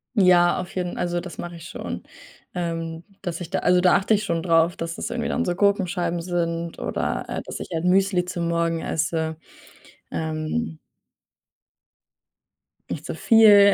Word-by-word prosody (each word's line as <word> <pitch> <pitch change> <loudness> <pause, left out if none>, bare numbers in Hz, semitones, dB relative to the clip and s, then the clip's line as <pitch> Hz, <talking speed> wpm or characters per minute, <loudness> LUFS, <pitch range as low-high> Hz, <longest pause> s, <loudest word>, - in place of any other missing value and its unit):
Ja, 180 -3 +5
auf 180 - -6
jeden 180 -1 -2
also, 175 0 0
das 180 0 -8
mache 175 0 -6
ich 165 - -11
schon, - - -6 0.5
ähm, 165 -1 -3 0.2
dass 175 0 -4
ich 170 - -7
da - - +1
also, 180 0 +4
da 180 0 +5
achte 210 +3 +3
ich 210 - -1
schon 165 -4 -1
drauf, 165 0 +3
dass 165 0 -4
es - - -3
irgendwie 235 -1 -2
dann 245 - 0
so 175 - +1
Gurkenscheiben 180 -3 +1
sind 170 -1 -2
oder, - - -2
äh, - - -3
dass - - -6
ich - - -6
halt 165 +2 -1
Müsli 185 -1 +3
zu 180 -1 -4
morgen 170 -1 0
esse. 160 0 -1 0.7
Ähm 160 +4 -2 2.1
Nicht - - -5
zu - - -4
viel. 205 -3 +7
175 Hz, 165 wpm, -24 LUFS, 165-185 Hz, 2.1 s, viel